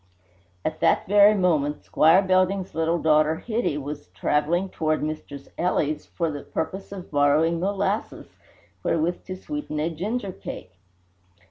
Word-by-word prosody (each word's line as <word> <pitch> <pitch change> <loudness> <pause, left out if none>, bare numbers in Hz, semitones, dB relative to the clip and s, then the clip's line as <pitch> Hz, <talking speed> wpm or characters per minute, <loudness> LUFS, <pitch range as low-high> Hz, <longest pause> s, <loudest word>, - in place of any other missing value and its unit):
] 90 -1 -36
At - - -2
that - - +3
very 205 +2 +6
moment 155 -6 +1
Squire 165 +5 +4
Belding's 185 0 +1
little 165 +1 +1
daughter 155 -1 +3
Hitty 220 -5 -2
was 145 +1 -6
travelling 170 +6 +1
toward 155 -3 -1
Mistress 150 -2 -6
Ely's 155 -4 0
for 165 -2 -2
the 145 -1 -6
purpose 190 +5 -5
of 190 -3 -8
borrowing 150 +3 +3
molasses 200 +3 -2 0.5
wherewith 165 +2 0
to 185 - -5
sweeten 240 - -5
a 160 +3 0
ginger 200 +5 -3
cake. 90 - -8
165 Hz, 140 wpm, -24 LUFS, 150-190 Hz, 0.5 s, very